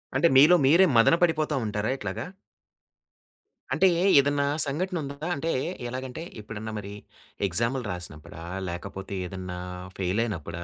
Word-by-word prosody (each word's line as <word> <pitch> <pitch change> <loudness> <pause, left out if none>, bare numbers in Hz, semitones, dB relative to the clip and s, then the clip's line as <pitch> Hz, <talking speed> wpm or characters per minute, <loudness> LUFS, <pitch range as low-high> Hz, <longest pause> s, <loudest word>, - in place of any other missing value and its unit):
అంటే, 150 +6 +5
మీలో 155 +6 +8
మీరే 170 +8 +6
మదన 115 +8 +6
పడిపోతా 155 -3 +2
ఉంటారా 105 +1 -2
ఇట్లాగా? - - -4 1.5
అంటే 190 - +4 0.3
ఏదన్నా 140 0 +2 0.2
సంఘటన 175 +6 -2
ఉందా? 140 0 -7 0.2
అంటే 165 +4 -2 0.4
ఎలాగంటే 130 +5 -5 0.2
ఎప్పుడన్నా 110 +1 -7
మరి 100 0 -8 0.5
ఎక్సామ్‌లు 115 +8 -1
రాసినప్పుడా? 80 -3 -9 0.3
లేకపోతే 95 +2 -6
ఏదన్నా 90 0 -6 0.4
ఫెయిల్ 95 +4 0
అయినప్పుడా? 85 -5 -5
115 Hz, 120 wpm, -26 LUFS, 95-145 Hz, 1.5 s, మీలో